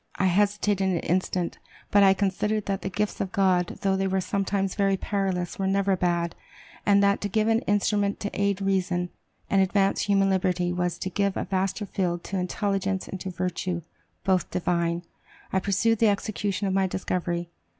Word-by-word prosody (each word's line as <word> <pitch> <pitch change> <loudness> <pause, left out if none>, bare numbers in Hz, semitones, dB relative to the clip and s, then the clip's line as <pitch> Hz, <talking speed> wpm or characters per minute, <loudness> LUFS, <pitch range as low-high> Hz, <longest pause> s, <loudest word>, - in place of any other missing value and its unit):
I 190 - 0
hesitated 200 +1 +2
an 175 -3 +1
instant; 180 0 -1 0.3
but 205 - +6
I 195 -1 +6
considered 205 +2 0
that 195 -1 -2
the 195 - -3
gifts 210 +2 -2
of 190 - -2
God, 185 -3 +2
though 195 -1 +2
they 195 0 0
were 190 0 +1
sometimes 195 0 -1
very 195 -1 +2
perilous, 190 -3 -2
were 190 - 0
never 195 0 +2
bad, 175 -1 0 0.5
and 200 0 +5
that 200 0 +3
to 205 - -2
give 215 +2 +1
an 225 0 +3
instrument 205 0 +1
to 205 - -3
aid 200 -1 0
reason, 180 -2 0 0.4
and 195 - +3
advance 195 +1 +2
human 195 -1 +3
liberty, 180 -1 +1
was 180 -1 -1
to 185 - -4
give 200 +1 0
a - - -1
vaster 195 +2 -1
field 175 -3 -2
to 195 - -3
intelligence 195 +1 -1
and 190 - -6
to 190 - -4
virtue, 180 -1 -3 0.4
both 190 -2 +1
divine. 170 -1 0 0.5
I 190 - +3
pursued 200 +4 +1
the 225 - +5
execution 200 -1 -1
of 190 - 0
my 190 0 +2
discovery. 175 -2 -2
195 Hz, 180 wpm, -26 LUFS, 180-200 Hz, 0.5 s, but